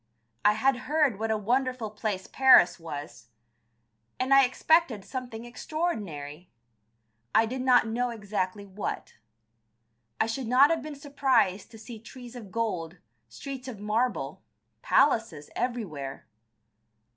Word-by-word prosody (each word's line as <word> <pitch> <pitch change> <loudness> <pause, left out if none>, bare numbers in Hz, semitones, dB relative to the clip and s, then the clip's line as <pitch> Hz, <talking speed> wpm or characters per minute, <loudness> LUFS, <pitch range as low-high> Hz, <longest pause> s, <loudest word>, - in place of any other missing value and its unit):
I 210 - +5
had 265 +5 +2
heard 295 -9 +2
what 225 0 -2
a 220 - +1
wonderful 245 +1 -1
place 210 -3 -3
Paris 180 -11 +5
was, 145 -7 -8 0.9
and 260 +1 +2
I 275 -1 +7
expected 255 - +2
something 245 -3 -6
extraordinary. 200 - -4 0.9
I 225 - +6
did 255 +3 -4
not 250 -2 +5
know 240 +2 -1
exactly 205 -3 -3
what. 200 +1 -6 1.0
I - - +3
should 230 +2 -3
not 265 +6 +6
have 330 - 0
been 305 -1 -7
surprised 270 -9 +1
to 225 - -13
see 225 +1 -10
trees 245 +2 -12
of 215 -6 -10
gold, 185 -7 -2 0.3
streets 265 - -8
of 235 -6 -7
marble, 210 - -1 0.4
palaces 220 - +2
everywhere. 175 - -4
225 Hz, 125 wpm, -28 LUFS, 195-255 Hz, 1.0 s, I